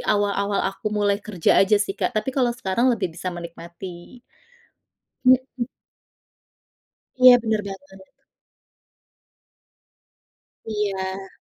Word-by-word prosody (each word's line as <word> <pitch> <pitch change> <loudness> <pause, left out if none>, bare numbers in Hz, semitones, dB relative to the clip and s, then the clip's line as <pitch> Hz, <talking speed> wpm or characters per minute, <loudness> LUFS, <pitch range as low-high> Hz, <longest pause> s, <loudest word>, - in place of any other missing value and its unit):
awal-awal 200 -1 0
aku 195 +2 -4
mulai 205 -1 +1
kerja 195 -6 +2
aja 195 +2 +4
sih, 205 -1 -1
Kak. 190 +1 -3
Tapi 255 +5 -1
kalau 255 -3 +2
sekarang 235 +2 +1
lebih 230 -9 0
bisa 185 - -5
menikmati. 175 +4 -9 1.0
Mhm. 255 -1 +3 1.5
Iya, 255 -1 +9
bener 220 -2 0
banget. 190 -1 -11 2.6
Iya. 195 -3 -3
200 Hz, 95 wpm, -23 LUFS, 190-225 Hz, 2.6 s, Iya